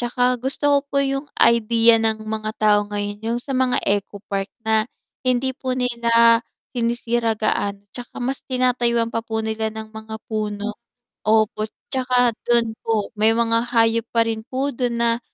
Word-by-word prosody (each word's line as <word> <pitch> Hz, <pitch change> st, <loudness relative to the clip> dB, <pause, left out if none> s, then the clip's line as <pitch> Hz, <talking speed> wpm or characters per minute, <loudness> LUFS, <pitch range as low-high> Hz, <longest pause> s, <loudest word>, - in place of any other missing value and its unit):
Tsaka 245 Hz, +1 st, -2 dB, 0.2 s
gusto 265 Hz, +3 st, -3 dB
ko 285 Hz, -, +5 dB
po 280 Hz, -, -4 dB
yung 275 Hz, +1 st, -2 dB
idea 230 Hz, 0 st, +4 dB
ng 220 Hz, -1 st, 0 dB
mga 215 Hz, 0 st, -3 dB
tao 210 Hz, -1 st, +4 dB
ngayon, 205 Hz, 0 st, -4 dB
yung 230 Hz, +2 st, -1 dB
sa 275 Hz, -, -5 dB
mga 255 Hz, -1 st, +2 dB
ecopark 200 Hz, 0 st, -2 dB, 0.2 s
na 220 Hz, +1 st, +2 dB, 0.3 s
hindi 255 Hz, +1 st, +1 dB
po 260 Hz, -1 st, -3 dB
nila 235 Hz, -2 st, +4 dB, 0.3 s
sinisira 235 Hz, -1 st, 0 dB
gaano, 205 Hz, -1 st, -1 dB
tsaka 245 Hz, -1 st, -9 dB
mas 260 Hz, +2 st, -2 dB
tinatayuan 240 Hz, -2 st, +1 dB
pa 230 Hz, -, 0 dB
po 220 Hz, -1 st, -3 dB
nila 220 Hz, 0 st, -1 dB
ng 220 Hz, 0 st, -8 dB
mga 220 Hz, 0 st, -7 dB
puno. 215 Hz, -1 st, -3 dB, 0.5 s
Opo. 215 Hz, 0 st, +2 dB, 0.2 s
Tsaka 250 Hz, -2 st, +2 dB, 0.2 s
dun 235 Hz, -2 st, +3 dB
po 220 Hz, -3 st, -1 dB
may 220 Hz, +1 st, +4 dB
mga 230 Hz, 0 st, +1 dB
hayop 230 Hz, -1 st, +2 dB
pa 230 Hz, -1 st, +3 dB
rin 225 Hz, -1 st, -3 dB
po 270 Hz, +2 st, -1 dB
dun 245 Hz, -1 st, -1 dB
na 235 Hz, 0 st, +2 dB
230 Hz, 160 wpm, -22 LUFS, 220-245 Hz, 0.5 s, ko